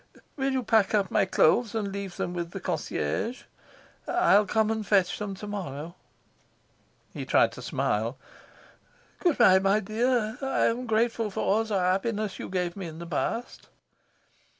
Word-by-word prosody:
"Will 270 Hz, -1 st, 0 dB
you 260 Hz, -1 st, -1 dB
pack 220 Hz, -2 st, +3 dB
up 200 Hz, -3 st, +1 dB
my 210 Hz, -2 st, +3 dB
clothes 205 Hz, +5 st, +3 dB
and 205 Hz, -3 st, -2 dB
leave 195 Hz, -2 st, -6 dB
them 175 Hz, -, -3 dB
with 170 Hz, -1 st, -4 dB
the -, -, -7 dB
concierge? 225 Hz, -, -3 dB, 0.6 s
I'll 210 Hz, -, +4 dB
come 220 Hz, +2 st, +1 dB
and 220 Hz, -1 st, -2 dB
fetch 190 Hz, -4 st, +2 dB
them 200 Hz, -2 st, -4 dB
to 200 Hz, -, -8 dB
morrow." 170 Hz, -6 st, -5 dB, 1.2 s
He -, -, -5 dB
tried -, -, +3 dB
to -, -, -10 dB
smile. -, -, -1 dB, 1.0 s
"Good 345 Hz, -5 st, +2 dB
bye, 190 Hz, -6 st, +6 dB
my 195 Hz, +2 st, +3 dB
dear. 220 Hz, +2 st, 0 dB
I'm 250 Hz, -2 st, 0 dB
grateful 225 Hz, 0 st, +1 dB
for 195 Hz, -, -4 dB
all 220 Hz, +3 st, +2 dB
the 215 Hz, -3 st, -1 dB
happiness 195 Hz, +3 st, -1 dB
you -, -, -6 dB
gave 180 Hz, -2 st, -2 dB
me 190 Hz, -3 st, -6 dB
in 160 Hz, -1 st, -9 dB
the 170 Hz, -, -7 dB
past." 225 Hz, +8 st, -3 dB
210 Hz, 160 wpm, -27 LUFS, 190-225 Hz, 1.2 s, bye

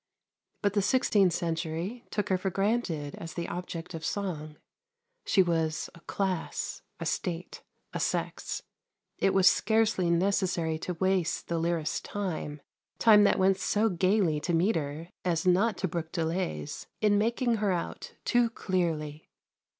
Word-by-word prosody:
But 200 Hz, -1 st, +2 dB
the 205 Hz, -, +3 dB
sixteenth 205 Hz, -4 st, +3 dB
century 170 Hz, +7 st, -3 dB
took 210 Hz, -, -2 dB
her 190 Hz, -, +3 dB
for 190 Hz, -, -1 dB
granted 195 Hz, -7 st, -1 dB
as 165 Hz, -1 st, -7 dB
the 170 Hz, -1 st, -3 dB
object 175 Hz, 0 st, -5 dB
of 160 Hz, -1 st, -6 dB
song; 155 Hz, -7 st, -3 dB, 0.7 s
she 190 Hz, -, +5 dB
was 165 Hz, -3 st, -1 dB
a 170 Hz, -, -14 dB
class, 185 Hz, 0 st, -2 dB, 0.2 s
a -, -, -4 dB
state, 175 Hz, -1 st, -3 dB, 0.3 s
a -, -, -2 dB
sex. -, -, -2 dB, 0.6 s
It 195 Hz, -, +3 dB
was 190 Hz, -1 st, +5 dB
scarcely 215 Hz, -3 st, +3 dB
necessary 170 Hz, -3 st, +1 dB
to 180 Hz, +2 st, -4 dB
waste 185 Hz, -1 st, 0 dB
the 170 Hz, -1 st, 0 dB
lyrist's 165 Hz, -2 st, 0 dB
time 160 Hz, -7 st, -4 dB, 0.3 s
time 210 Hz, -2 st, +7 dB
that -, -, +4 dB
went 190 Hz, 0 st, +3 dB
so 220 Hz, +2 st, +2 dB
gaily 185 Hz, -3 st, +2 dB
to 170 Hz, +2 st, 0 dB
metre 165 Hz, -3 st, 0 dB
as 170 Hz, -2 st, 0 dB
not 190 Hz, +4 st, +3 dB
to 190 Hz, -, -1 dB
brook 165 Hz, -1 st, -4 dB
delays 165 Hz, -3 st, -2 dB
in 205 Hz, -1 st, +3 dB
making 235 Hz, +2 st, +1 dB
her 205 Hz, -2 st, +1 dB
out 175 Hz, -2 st, -4 dB
too 240 Hz, -1 st, +3 dB
clearly. 160 Hz, -8 st, -2 dB
180 Hz, 145 wpm, -29 LUFS, 165-200 Hz, 0.7 s, time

